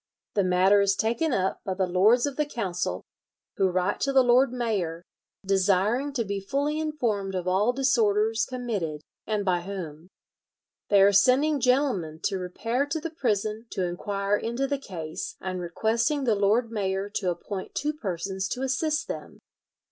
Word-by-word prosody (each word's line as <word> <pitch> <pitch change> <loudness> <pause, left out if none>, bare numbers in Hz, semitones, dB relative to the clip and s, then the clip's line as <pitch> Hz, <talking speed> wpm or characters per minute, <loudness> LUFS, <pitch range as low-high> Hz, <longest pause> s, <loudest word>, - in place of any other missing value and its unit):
The 200 - +2
matter 185 +2 +4
is 195 0 +2
taken 235 +10 0
up 190 -5 0
by 190 - -3
the 190 0 +1
lords 200 +7 +4
of 285 -2 -3
the 300 +1 0
Council, 190 -10 -3 0.5
who 190 -1 +3
write 185 +1 0
to 275 - 0
the 265 -1 +5
lord 245 +2 +4
mayor, 200 -9 -2 0.4
desiring 200 +8 +2
to 235 -4 -1
be 200 0 -2
fully 285 +9 -1
informed 235 -11 -1
of 180 -1 -3
all 195 +6 +3
disorders 225 -4 +2
committed, 210 - -3 0.3
and 210 -2 -1
by 180 -2 +1
whom. 175 -4 -7 0.8
"They 200 -1 +6
are 200 +1 +5
sending 270 +9 +4
gentlemen 250 - +1
to 195 -2 0
repair 230 +9 -2
to 320 +3 -2
the 325 +1 -5
prison 220 -6 -1
to 185 - -1
inquire 200 +3 -1
into 235 +5 -2
the 280 0 -2
case, 165 - -6
and 185 -1 -4
requesting 230 - 0
the 235 -4 +3
lord 215 +4 +2
mayor 195 -2 -1
to 185 - -1
appoint 185 +2 -5
two 300 +1 -1
persons 190 - -3
to 255 - -4
assist 300 +4 0
them." - - -7
205 Hz, 165 wpm, -26 LUFS, 190-255 Hz, 0.8 s, They